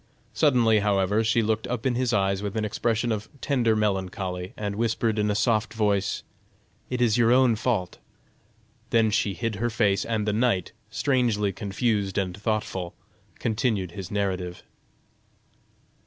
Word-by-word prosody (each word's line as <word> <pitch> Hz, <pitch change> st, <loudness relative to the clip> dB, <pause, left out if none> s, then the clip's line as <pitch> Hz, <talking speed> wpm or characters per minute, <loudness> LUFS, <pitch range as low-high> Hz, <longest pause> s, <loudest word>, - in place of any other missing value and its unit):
Suddenly, 120 Hz, -7 st, +4 dB
however, 100 Hz, +1 st, +2 dB
she 115 Hz, +1 st, +2 dB
looked 110 Hz, 0 st, -1 dB
up 125 Hz, -1 st, -3 dB
in 130 Hz, -, +2 dB
his 125 Hz, 0 st, 0 dB
eyes 100 Hz, -2 st, +1 dB
with 105 Hz, +1 st, -4 dB
an 110 Hz, -, 0 dB
expression 115 Hz, +2 st, 0 dB
of 110 Hz, 0 st, -3 dB
tender 120 Hz, -6 st, +1 dB
melancholy, 95 Hz, -3 st, -2 dB
and 100 Hz, -1 st, -3 dB
whispered 115 Hz, 0 st, 0 dB
in 105 Hz, 0 st, +1 dB
a 105 Hz, -, +1 dB
soft 110 Hz, +1 st, +1 dB
voice: 100 Hz, -2 st, 0 dB, 0.7 s
"It 125 Hz, -1 st, 0 dB
is 115 Hz, -1 st, +2 dB
your 115 Hz, 0 st, +4 dB
own 125 Hz, -2 st, +5 dB
fault." 110 Hz, -5 st, -2 dB, 0.9 s
Then 110 Hz, -2 st, +3 dB
she 100 Hz, -2 st, 0 dB
hid 115 Hz, -3 st, -3 dB
her 120 Hz, +3 st, 0 dB
face, 105 Hz, -4 st, +1 dB
and 110 Hz, -2 st, -2 dB
the 105 Hz, -, +1 dB
knight, 110 Hz, -5 st, +1 dB, 0.2 s
strangely 110 Hz, -3 st, +1 dB
confused 100 Hz, -2 st, -1 dB
and 95 Hz, -3 st, -1 dB
thoughtful, 105 Hz, -4 st, -3 dB, 0.4 s
continued 110 Hz, -5 st, -1 dB
his 95 Hz, -1 st, -7 dB
narrative. 95 Hz, -3 st, -2 dB
105 Hz, 150 wpm, -26 LUFS, 100-115 Hz, 0.9 s, own